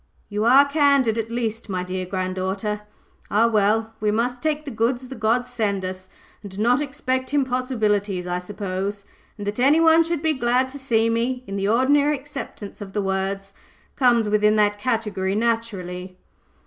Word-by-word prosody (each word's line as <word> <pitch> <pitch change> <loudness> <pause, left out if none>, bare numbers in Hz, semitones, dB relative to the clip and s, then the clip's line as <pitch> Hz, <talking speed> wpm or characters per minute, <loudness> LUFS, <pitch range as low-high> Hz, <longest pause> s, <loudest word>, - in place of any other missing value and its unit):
"You 210 +1 -1
are 265 +4 +7
candid, 280 -6 +3
at 225 0 -3
least, 230 -2 -3
my 185 -2 -2
dear 185 0 -4
granddaughter. 190 +3 -2 0.5
Ah, 215 +3 +3
well! 220 0 +2
we 210 - +1
must 240 +4 0
take 305 -1 -1
the 280 - -5
goods 240 +3 -1
the 265 - -8
gods 235 +2 +1
send 200 -5 -1
us, 185 0 -7 0.3
and 200 -2 -10
not 245 +6 +3
expect 260 -1 -2
impossibilities, 220 -8 0
I 180 0 -2
suppose! 200 +1 -4 0.3
And 205 - -6
that 205 +3 -3
any 280 +5 +5
one 325 0 +6
should 330 -2 -3
be 315 -1 +2
glad 255 0 +1
to 280 +2 -8
see 230 -4 +2
me, 240 +2 -1
in 195 - -6
the 195 0 -1
ordinary 285 +6 +3
acceptation 265 -7 -8
of 195 -1 -8
the 210 - 0
words, 195 +1 -2 0.4
comes 240 -5 +3
within 210 0 +3
that 205 -1 +2
category, 210 -5 -1
naturally." 195 -6 -2
225 Hz, 170 wpm, -23 LUFS, 200-255 Hz, 0.5 s, are